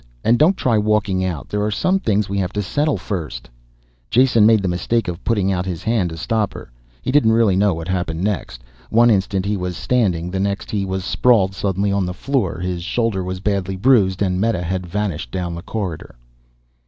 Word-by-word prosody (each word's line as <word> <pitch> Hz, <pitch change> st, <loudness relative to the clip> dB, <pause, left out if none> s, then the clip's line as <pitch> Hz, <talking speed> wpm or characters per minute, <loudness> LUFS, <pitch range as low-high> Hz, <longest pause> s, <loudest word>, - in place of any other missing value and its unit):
And 120 Hz, +1 st, +3 dB
don't 175 Hz, +6 st, +4 dB
try 115 Hz, -4 st, +2 dB
walking 105 Hz, -3 st, +1 dB
out, 90 Hz, -6 st, -3 dB
there 105 Hz, -, -2 dB
are 105 Hz, -, 0 dB
some 185 Hz, -, +1 dB
things 105 Hz, -, 0 dB
we 100 Hz, +1 st, -2 dB
have 90 Hz, -1 st, -1 dB
to 105 Hz, -, -1 dB
settle 145 Hz, +9 st, 0 dB
first 75 Hz, -, -5 dB, 0.3 s
" -, -, -38 dB
Jason 120 Hz, -4 st, +4 dB
made 110 Hz, -3 st, +4 dB
the -, -, 0 dB
mistake 90 Hz, +5 st, 0 dB
of 90 Hz, 0 st, -5 dB
putting 100 Hz, -4 st, +1 dB
out 90 Hz, 0 st, -1 dB
his 90 Hz, -2 st, -4 dB
hand 110 Hz, -6 st, +1 dB
to 80 Hz, -, -8 dB
stop 110 Hz, +1 st, -1 dB
her. -, -, -10 dB, 0.3 s
He -, -, -1 dB
didn't 120 Hz, -6 st, +4 dB
really 110 Hz, -4 st, +3 dB
know 100 Hz, -2 st, +2 dB
what 80 Hz, 0 st, -6 dB
happened 90 Hz, -2 st, -2 dB
next. 95 Hz, -, -3 dB, 0.3 s
One 120 Hz, +1 st, +5 dB
instant 95 Hz, -1 st, 0 dB
he 105 Hz, +1 st, 0 dB
was 90 Hz, -3 st, -4 dB
standing 90 Hz, -9 st, 0 dB
the 95 Hz, -, -2 dB
next 100 Hz, 0 st, -2 dB
he 100 Hz, -2 st, -1 dB
sprawled 100 Hz, 0 st, +2 dB
suddenly 100 Hz, +1 st, -1 dB
on 100 Hz, -2 st, 0 dB
the 90 Hz, -, -5 dB
floor. 130 Hz, -9 st, -1 dB
His 90 Hz, -1 st, -3 dB
shoulder 110 Hz, -2 st, -1 dB
was 90 Hz, 0 st, -5 dB
badly 100 Hz, -2 st, -1 dB
bruised, 100 Hz, -3 st, +3 dB
and 90 Hz, -1 st, 0 dB
Meta 110 Hz, -5 st, 0 dB
had 90 Hz, +1 st, -3 dB
vanished 95 Hz, -2 st, -3 dB
down 90 Hz, -2 st, -3 dB
the 85 Hz, -, -6 dB
corridor. 95 Hz, -, -5 dB
95 Hz, 210 wpm, -20 LUFS, 90-110 Hz, 0.3 s, One